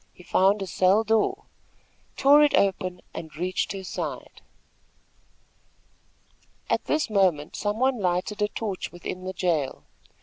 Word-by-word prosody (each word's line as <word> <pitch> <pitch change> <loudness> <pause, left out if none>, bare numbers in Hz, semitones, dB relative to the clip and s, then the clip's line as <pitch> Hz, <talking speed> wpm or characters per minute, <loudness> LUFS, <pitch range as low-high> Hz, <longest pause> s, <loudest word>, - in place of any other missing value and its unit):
He 180 - -15
found 195 +3 +2
a - - -4
cell 190 +4 +3
door, 225 - +1 0.7
tore 285 +2 +6
it 295 -1 +4
open 185 -2 0
and 160 -2 -8
reached 180 +3 -2
her 195 -1 -6
side. 185 - -6 2.3
At - - +1
this 305 0 0
moment 185 -8 +1
some 205 0 -2
one 260 0 +1
lighted 185 +3 -1
a 210 - +3
torch 210 -3 -4
within 180 +1 -7
the 185 - -4
jail. 165 -7 -1
190 Hz, 135 wpm, -25 LUFS, 180-220 Hz, 2.3 s, tore